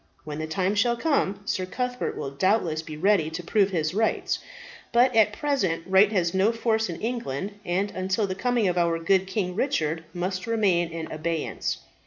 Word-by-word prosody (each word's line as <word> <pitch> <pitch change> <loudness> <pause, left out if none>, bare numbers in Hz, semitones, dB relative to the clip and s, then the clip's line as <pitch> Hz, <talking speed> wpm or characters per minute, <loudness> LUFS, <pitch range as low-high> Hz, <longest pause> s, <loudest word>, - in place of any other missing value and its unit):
When 150 -1 -6
the 155 - -3
time 185 +5 0
shall 235 +3 +2
come, 235 -8 0
Sir 185 -2 -1
Cuthbert 250 +5 -3
will 135 - -4
doubtless 165 +1 +1
be 155 -1 -8
ready 185 -2 +3
to 165 +2 -6
prove 200 +2 +2
his 160 -3 -1
rights. 220 +2 0 0.5
But 245 +1 +4
at 215 -2 +5
present 210 - -1
right 190 +2 +5
has 175 -4 +1
no 190 +4 +3
force 225 -2 0
in 170 - -5
England, 205 - -3
and 195 +2 -1
until 190 +3 -1
the 190 - -3
coming 235 +2 +1
of 180 -1 +1
our 170 -1 +2
good 190 +3 +2
King 190 -3 -2
Richard 165 - -1
must 185 +2 -3
remain 195 -7 +2
in 165 0 -6
abeyance. 160 0 -2
190 Hz, 185 wpm, -26 LUFS, 170-220 Hz, 0.5 s, at